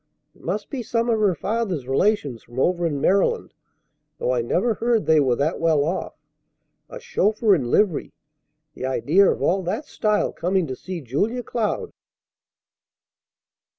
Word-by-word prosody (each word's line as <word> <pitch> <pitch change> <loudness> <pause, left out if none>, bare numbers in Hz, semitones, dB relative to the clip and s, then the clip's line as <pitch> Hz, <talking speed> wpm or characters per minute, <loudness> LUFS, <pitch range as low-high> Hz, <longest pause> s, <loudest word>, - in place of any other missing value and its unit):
It - - -23
must 210 -1 -4
be 270 - -3
some 230 +1 0
of 225 - +1
her 200 -4 +2
father's 195 - -2
relations 140 - +1
from 120 +2 -9
over 175 +3 +2
in 145 -3 -2
Maryland, 195 +7 +1 0.6
though - - -1
I 120 - +1
never 185 - +1
heard 230 0 0
they 160 -1 +5
were 130 -4 +2
that 145 +6 -1
well 160 -3 +3
off. 180 +4 -3 0.7
A - - -8
chauffeur 210 +1 +2
in 130 -10 0
livery! 185 - +1 0.6
The 130 - -4
idea 155 +9 +3
of - - -1
all 190 +3 +2
that 185 - -3
style 210 -1 0
coming 185 +1 0
to 130 -3 -5
see 180 +4 -7
Julia 205 - -1
Cloud!" 240 - -2
185 Hz, 155 wpm, -23 LUFS, 140-215 Hz, 0.7 s, they